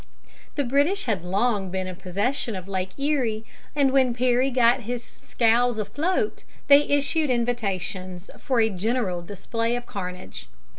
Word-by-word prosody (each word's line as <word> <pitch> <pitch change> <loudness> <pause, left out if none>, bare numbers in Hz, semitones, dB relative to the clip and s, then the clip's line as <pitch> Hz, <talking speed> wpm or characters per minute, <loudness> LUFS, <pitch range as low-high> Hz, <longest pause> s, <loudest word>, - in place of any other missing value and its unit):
The 285 - +1
British 285 +10 +2
had 205 -8 -1
long 200 +1 0
been 190 0 -2
in 185 -1 -6
possession 200 +6 -2
of 185 0 -7
Lake 190 -1 -3
Erie, 260 -7 0 0.3
and 280 -2 +3
when 260 -3 +3
Perry 250 +2 +2
got 245 0 +4
his 240 +1 -4
scows 235 0 +1
afloat 320 - -1 0.2
they 285 0 +8
issued 285 +1 +2
invitations 195 -6 -2
for 255 -3 0
a 220 -1 +3
general 195 -2 -1
display 230 +6 -2
of 245 0 -4
carnage. 185 -5 -7
235 Hz, 145 wpm, -25 LUFS, 195-260 Hz, 0.3 s, they